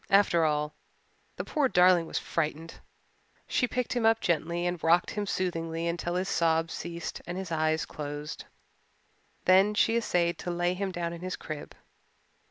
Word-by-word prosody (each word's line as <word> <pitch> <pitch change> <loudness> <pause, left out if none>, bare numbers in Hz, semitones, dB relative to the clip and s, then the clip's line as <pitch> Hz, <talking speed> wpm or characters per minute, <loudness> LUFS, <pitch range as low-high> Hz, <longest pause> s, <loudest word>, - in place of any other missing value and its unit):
After 195 -4 +4
all, 150 0 0 0.6
the - - -4
poor 295 -4 +1
darling 180 -3 +5
was - - -3
frightened. 160 0 -2 0.7
She 250 - +1
picked 250 0 -2
him 245 -2 0
up 225 0 +4
gently 170 +1 0
and 175 -2 -2
rocked 170 +2 +4
him 210 -1 -3
soothingly 165 -3 -2
until 175 +1 -2
his 185 +1 0
sobs 165 -1 +1
ceased 170 0 -5
and 175 +1 -4
his 190 -3 -5
eyes 155 0 +1
closed. 145 0 -6 1.0
Then 190 +3 +5
she 225 +2 +3
essayed 175 -7 +1
to - - -4
lay 175 +1 0
him 195 +1 -2
down 170 -1 -3
in 170 - -8
his 185 0 -3
crib. 155 -2 -7
175 Hz, 165 wpm, -29 LUFS, 165-185 Hz, 1.0 s, darling